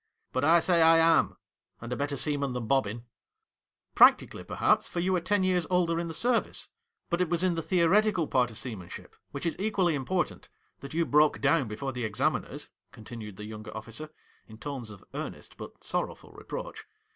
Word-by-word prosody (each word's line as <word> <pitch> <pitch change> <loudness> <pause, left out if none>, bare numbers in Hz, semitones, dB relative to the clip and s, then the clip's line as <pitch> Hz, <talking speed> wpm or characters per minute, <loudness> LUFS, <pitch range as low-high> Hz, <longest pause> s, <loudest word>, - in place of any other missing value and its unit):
But 130 - 0
I 165 +3 +6
say 175 -1 +3
I 165 0 +7
am, 165 0 +4 0.4
and 120 +1 -5
a - - -1
better 140 +2 -2
sea 150 +1 0
man 140 -2 -2
than 125 -2 -3
Bobbin.' 115 -2 0 0.5
' - - -61
Practically, - - +5
perhaps, - - +1
for 175 - -3
you 185 +2 +1
are 180 - 0
ten 205 +2 +1
years 180 -2 +1
older 175 -2 +2
in 170 - -3
the 165 - -5
service. 240 +4 0 0.4
But 170 +1 +1
it 180 - +1
was 170 +1 +1
in 185 -2 +2
the 165 - -2
theo 170 0 +2
retical 205 -2 +3
part 125 -2 +2
of 110 - -8
seamanship 105 -9 -7
— - - -53
which 140 +4 -6
is 165 - 0
equally 195 -4 +1
important 160 +6 -2
— - - -43
that 140 +2 -9
you 170 0 +2
broke 150 0 +3
down 135 -2 +2
before 120 +6 -4
the 125 -1 -4
examiners,' 105 -2 -2 0.2
continued 110 -3 -9
the 105 - -7
younger 110 0 -8
officer, 115 +8 -6 0.4
in 110 - -12
tones 125 0 -6
of 100 -3 -12
earnest - - -7
but - - -10
sorrowful - - -3
reproach. - - -7
150 Hz, 205 wpm, -28 LUFS, 120-175 Hz, 0.5 s, I